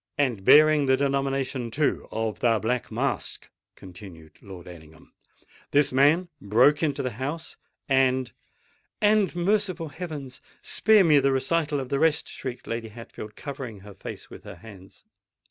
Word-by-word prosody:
"And 125 Hz, -9 st, 0 dB
bearing 150 Hz, +3 st, +6 dB
the 130 Hz, 0 st, +4 dB
denomination, 135 Hz, -2 st, -1 dB
too, 145 Hz, +5 st, -1 dB
of 110 Hz, -1 st, -3 dB
the 115 Hz, -2 st, +3 dB
Black 120 Hz, +3 st, -2 dB
Mask," -, -, -3 dB, 0.3 s
continued 90 Hz, -4 st, -13 dB
Lord 95 Hz, -3 st, -11 dB
Ellingham;—"this 90 Hz, -, -4 dB
man 145 Hz, +7 st, +3 dB
broke 125 Hz, +9 st, +3 dB
into 150 Hz, -4 st, -1 dB
the 130 Hz, -, -2 dB
house—and——" 130 Hz, -1 st, -2 dB, 0.7 s
"And—merciful 195 Hz, -4 st, +1 dB
heavens! 145 Hz, -5 st, -8 dB, 0.2 s
Spare 215 Hz, -2 st, +4 dB
me 155 Hz, -4 st, +5 dB
the 135 Hz, 0 st, +2 dB
recital 145 Hz, +3 st, 0 dB
of 130 Hz, -2 st, -6 dB
the 140 Hz, -, 0 dB
rest!" 160 Hz, -1 st, +2 dB
shrieked 125 Hz, -2 st, -7 dB
Lady 115 Hz, 0 st, -4 dB
Hatfield, 110 Hz, -1 st, -10 dB
covering 130 Hz, -8 st, -7 dB
her 100 Hz, +1 st, -12 dB
face -, -, -9 dB
with -, -, -13 dB
her -, -, -10 dB
hands. 95 Hz, 0 st, -15 dB
135 Hz, 135 wpm, -25 LUFS, 110-150 Hz, 0.7 s, bearing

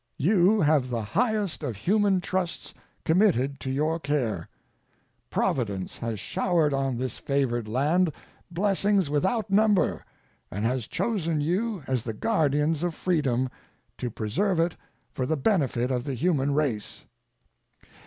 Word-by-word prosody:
You 195 Hz, +5 st, +4 dB
have 145 Hz, -4 st, +3 dB
the 115 Hz, -3 st, -2 dB
highest 210 Hz, -, 0 dB
of 115 Hz, -, -3 dB
human 195 Hz, -, +2 dB
trusts 180 Hz, -1 st, -3 dB, 0.3 s
committed 160 Hz, -, +2 dB
to 130 Hz, -, -5 dB
your 155 Hz, +5 st, 0 dB
care. 125 Hz, -, -1 dB, 0.8 s
Providence 100 Hz, -7 st, -1 dB
has 115 Hz, -3 st, -3 dB
showered 170 Hz, -, +1 dB
on 135 Hz, -2 st, 0 dB
this 130 Hz, +1 st, -3 dB
favored 125 Hz, -5 st, 0 dB
land 155 Hz, +9 st, +2 dB, 0.4 s
blessings 195 Hz, -1 st, +1 dB
without 190 Hz, +8 st, 0 dB
number, 210 Hz, -1 st, +3 dB, 0.5 s
and 105 Hz, +3 st, -3 dB
has 125 Hz, -1 st, -1 dB
chosen 170 Hz, -9 st, -1 dB
you 185 Hz, +4 st, -1 dB
as 130 Hz, -3 st, 0 dB
the 110 Hz, 0 st, -4 dB
guardians 150 Hz, -, +1 dB
of 175 Hz, -2 st, -1 dB
freedom, 135 Hz, -8 st, +1 dB, 0.5 s
to 125 Hz, -, -2 dB
preserve 160 Hz, -, -1 dB
it 165 Hz, 0 st, +1 dB, 0.4 s
for 130 Hz, -, -2 dB
the 160 Hz, -, 0 dB
benefit 135 Hz, -, +1 dB
of 125 Hz, -1 st, 0 dB
the 140 Hz, -2 st, -2 dB
human 140 Hz, -1 st, +1 dB
race. 130 Hz, -9 st, -2 dB
150 Hz, 135 wpm, -26 LUFS, 125-185 Hz, 0.8 s, You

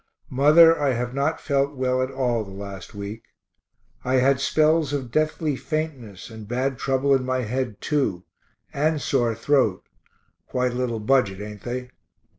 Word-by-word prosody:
Mother, 155 Hz, +5 st, +6 dB
I 140 Hz, -3 st, +2 dB
have 125 Hz, +1 st, -3 dB
not 140 Hz, +4 st, 0 dB
felt 140 Hz, 0 st, 0 dB
well 130 Hz, -1 st, 0 dB
at 130 Hz, -, -1 dB
all 125 Hz, -4 st, -1 dB
the 100 Hz, -, -12 dB
last 100 Hz, +1 st, -9 dB
week. 100 Hz, +2 st, -6 dB, 0.8 s
I 130 Hz, +1 st, 0 dB
had 130 Hz, +1 st, +3 dB
spells 155 Hz, +1 st, +2 dB
of 130 Hz, -4 st, -3 dB
deathly 155 Hz, 0 st, 0 dB
faintness 135 Hz, -, -5 dB
and 110 Hz, -2 st, -10 dB
bad 130 Hz, +2 st, -1 dB
trouble 135 Hz, +1 st, +1 dB
in 135 Hz, -1 st, +2 dB
my 130 Hz, 0 st, -1 dB
head 120 Hz, -1 st, -3 dB
too, 135 Hz, -, -1 dB, 0.5 s
and 155 Hz, +2 st, +1 dB
sore 120 Hz, -4 st, 0 dB
throat 115 Hz, -4 st, +1 dB, 0.6 s
(quite 125 Hz, -1 st, 0 dB
a -, -, -6 dB
little 125 Hz, -3 st, -2 dB
budget, 105 Hz, -4 st, +1 dB
ain't 105 Hz, -1 st, -8 dB
they?) 125 Hz, +1 st, -5 dB
130 Hz, 160 wpm, -24 LUFS, 115-140 Hz, 0.8 s, Mother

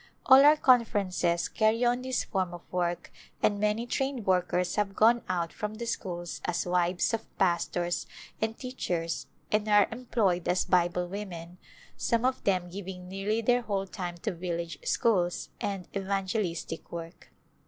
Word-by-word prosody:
All 265 Hz, +1 st, +9 dB
our 300 Hz, +1 st, +7 dB
conferences 200 Hz, -, +2 dB
carry 225 Hz, +2 st, +2 dB
on 245 Hz, +1 st, +2 dB
this 260 Hz, -1 st, -1 dB
form 185 Hz, -4 st, -2 dB
of 175 Hz, -, -11 dB
work 175 Hz, -1 st, -1 dB, 0.3 s
and 205 Hz, -1 st, +3 dB
many 210 Hz, +3 st, +1 dB
trained 265 Hz, -2 st, -2 dB
workers 180 Hz, -1 st, +1 dB
have 205 Hz, -2 st, 0 dB
gone 235 Hz, +2 st, +5 dB
out 170 Hz, -2 st, -1 dB
from 210 Hz, 0 st, -4 dB
the 235 Hz, +2 st, -5 dB
schools 175 Hz, -6 st, -4 dB
as 175 Hz, -, -1 dB
wives 175 Hz, +2 st, +1 dB
of 225 Hz, 0 st, -5 dB
pastors 175 Hz, -1 st, 0 dB, 0.3 s
and 220 Hz, +1 st, -1 dB
teachers 175 Hz, -10 st, -3 dB, 0.2 s
and 215 Hz, 0 st, +1 dB
are 205 Hz, -1 st, +5 dB
em 245 Hz, +2 st, -8 dB
ployed 185 Hz, -8 st, +1 dB
as 180 Hz, -, +2 dB
Bible 175 Hz, 0 st, +2 dB
women, 180 Hz, -3 st, -7 dB, 0.4 s
some 235 Hz, +1 st, +1 dB
of 260 Hz, 0 st, 0 dB
them 185 Hz, -3 st, +2 dB
giving 180 Hz, 0 st, -7 dB
nearly 195 Hz, +4 st, -1 dB
their 245 Hz, +2 st, +3 dB
whole 200 Hz, -4 st, -2 dB
time 180 Hz, -3 st, -5 dB
to 215 Hz, -, 0 dB
village 170 Hz, -2 st, -4 dB
schools 180 Hz, -7 st, +1 dB
and 195 Hz, -3 st, -3 dB
evan 195 Hz, 0 st, -1 dB
gelistic 180 Hz, -5 st, -3 dB
work. 165 Hz, 0 st, -8 dB
195 Hz, 160 wpm, -29 LUFS, 175-225 Hz, 0.4 s, All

